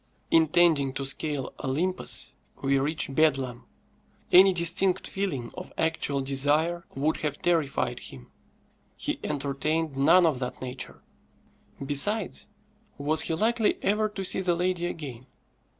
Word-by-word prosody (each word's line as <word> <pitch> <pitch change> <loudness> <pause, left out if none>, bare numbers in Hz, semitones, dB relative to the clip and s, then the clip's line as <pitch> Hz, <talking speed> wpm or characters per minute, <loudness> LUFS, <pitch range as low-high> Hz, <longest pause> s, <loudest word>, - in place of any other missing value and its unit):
Intending 160 -4 +4
to 135 0 -4
scale 135 0 -2
Olympus, 165 +8 -2 0.3
we 135 0 +2
reach 145 0 0
Bedlam; 135 -5 +1 0.7
any 190 +2 +8
distinct 180 +2 +2
feeling 155 -12 -3
of - - -9
actual 160 -3 0
desire 145 +6 0
would 150 +4 0
have 150 -2 -3
terrified 140 -7 0
him. 65 -2 -11 0.7
He - - -3
entertained 145 +2 -2
none 165 +7 +5
of 150 -6 +1
that 125 -1 -5
nature. 130 0 -7 0.8
Besides, 180 +9 0 0.5
was 150 +2 +3
he 165 - 0
likely 220 +4 +1
ever 215 +2 +1
to 200 -2 -6
see 190 - +2
the 180 -2 +1
lady 175 0 -1
again? 135 -7 -7
155 Hz, 125 wpm, -27 LUFS, 135-175 Hz, 0.8 s, any